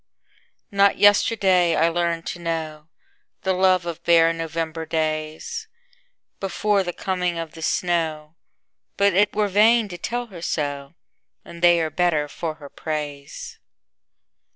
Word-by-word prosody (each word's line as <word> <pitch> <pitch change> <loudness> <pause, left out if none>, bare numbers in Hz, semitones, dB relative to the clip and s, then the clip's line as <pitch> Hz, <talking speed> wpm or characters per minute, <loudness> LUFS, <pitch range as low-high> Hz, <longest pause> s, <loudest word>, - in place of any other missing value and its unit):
Not 200 0 +3
yesterday 195 -4 +4
I 165 - +3
learned 170 -1 -1
to 175 - -5
knowThe 165 +3 -5
love 185 -1 +3
of 170 -2 -6
bare 165 -1 +5
November 165 0 -4
daysBefore 205 - -3
the 175 - -3
coming 180 -2 -1
of 165 -1 -5
the 165 - -12
snow, 160 -3 -1 0.6
But 200 -1 +3
it 205 +3 +2
were 210 -1 +2
vain 215 +2 +4
to 175 -1 -8
tell 245 0 -3
her 170 - -9
so, 145 -4 -3 0.5
And 170 - -11
they 175 -1 +5
are 160 -1 -2
better 170 -5 +1
for 160 +2 -5
her 145 -2 -11
praise. 145 -2 -6
170 Hz, 130 wpm, -23 LUFS, 160-195 Hz, 0.6 s, bare